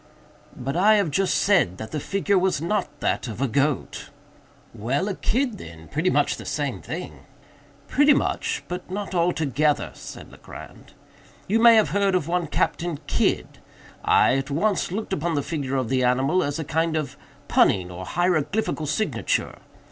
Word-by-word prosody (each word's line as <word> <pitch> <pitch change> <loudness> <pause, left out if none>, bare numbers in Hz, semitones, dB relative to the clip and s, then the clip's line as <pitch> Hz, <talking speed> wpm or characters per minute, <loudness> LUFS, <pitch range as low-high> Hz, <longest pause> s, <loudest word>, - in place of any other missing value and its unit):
"But 135 +4 -4
I 205 +5 +5
have 200 -7 +1
just 195 +5 +1
said 180 - +2
that 110 +2 -7
the 155 - -2
figure 200 +4 +1
was 185 -4 +1
not 175 +7 -2
that - - 0
of 110 -1 -7
a 135 - +1
goat." 140 +3 -1 0.6
"Well, 125 - -1
a 205 - -1
kid 245 0 -1
then—pretty 85 - -3
much - - +1
the - - -8
same - - -3
thing." - - -7 0.7
"Pretty 290 +1 +4
much, 450 -1 -1
but 180 +1 -6
not 200 +1 -4
altogether," 155 -4 +1
said - - -10
Legrand. - - -12 0.5
"You 220 +4 +2
may 230 0 +8
have 220 - +4
heard 200 -1 +1
of 170 -4 0
one 175 -1 0
Captain 165 +2 -1
Kidd. - - -1 0.4
I 130 - +4
at 135 +2 -5
once 185 +6 0
looked 205 +1 -3
upon 170 -1 -1
the 145 - 0
figure 140 -4 -3
of 130 -3 0
the 130 -1 +1
animal 135 +8 +2
as 145 0 -2
a 160 - -3
kind 160 +2 0
of 150 -4 -4 0.3
punning 90 -2 +3
or 90 +1 -7
hieroglyphical 175 - 0
signature. 210 +9 -1
165 Hz, 165 wpm, -24 LUFS, 140-195 Hz, 0.7 s, may